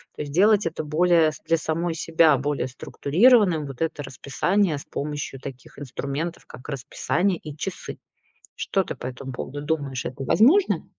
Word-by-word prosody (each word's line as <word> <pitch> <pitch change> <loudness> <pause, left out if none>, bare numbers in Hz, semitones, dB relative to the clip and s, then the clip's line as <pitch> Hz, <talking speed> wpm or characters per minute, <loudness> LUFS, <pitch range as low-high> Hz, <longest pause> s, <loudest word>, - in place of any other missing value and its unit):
То - - -5
есть 145 -1 -5
сделать 205 +2 +4
это 160 -1 -4
более 160 +1 +3
с - - -12
для 165 0 +3
самой 165 +2 -2
себя 160 -3 +4
более 140 -1 -1
структурированным 175 - +3
вот 135 +1 -9
это 160 -2 -2
расписание 150 +7 0
с 140 - -9
помощью 145 -2 -5
таких 130 0 -10
инструментов, 145 +4 -4
как 130 - -12
расписание 160 +7 -1
и 150 -1 -9
часы. 190 +4 -5 0.6
Что 195 - 0
ты - - -5
по - - -7
этому 130 +1 -6
поводу 145 +3 -6
думаешь? 145 -4 -2
Это 130 +1 -5
возможно? 270 - +4
155 Hz, 165 wpm, -24 LUFS, 140-175 Hz, 0.6 s, сделать